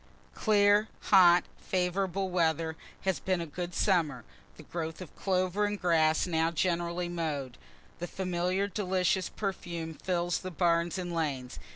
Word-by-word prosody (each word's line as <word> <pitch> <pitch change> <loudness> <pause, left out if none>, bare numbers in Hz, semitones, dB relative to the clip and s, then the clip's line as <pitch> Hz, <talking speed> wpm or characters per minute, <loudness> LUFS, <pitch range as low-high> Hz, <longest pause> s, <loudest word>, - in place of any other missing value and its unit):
_ - - -31
Clear, 205 0 +4 0.2
hot, 180 -3 +7
favorable 185 +1 -1
weather 160 -2 +1 0.3
has 190 -2 0
been 185 -2 0
a 170 - -3
good 175 +3 -6
summer 155 - +1 0.3
the 155 - -11
growth 160 0 -5
of 185 -4 -10
clover 185 +1 0
and 205 0 -2
grass 160 -3 +3
now 165 -2 +1
generally 170 +1 -1
mow'd. 155 -7 -3 0.4
The 175 - -4
familiar 185 +1 -1
delicious 190 -2 0
perfume 175 -5 -4
fills 175 +1 -1
the 185 - -6
barns 170 0 +1
and 175 -2 -4
lanes. 140 -6 -3
175 Hz, 145 wpm, -30 LUFS, 165-185 Hz, 0.4 s, hot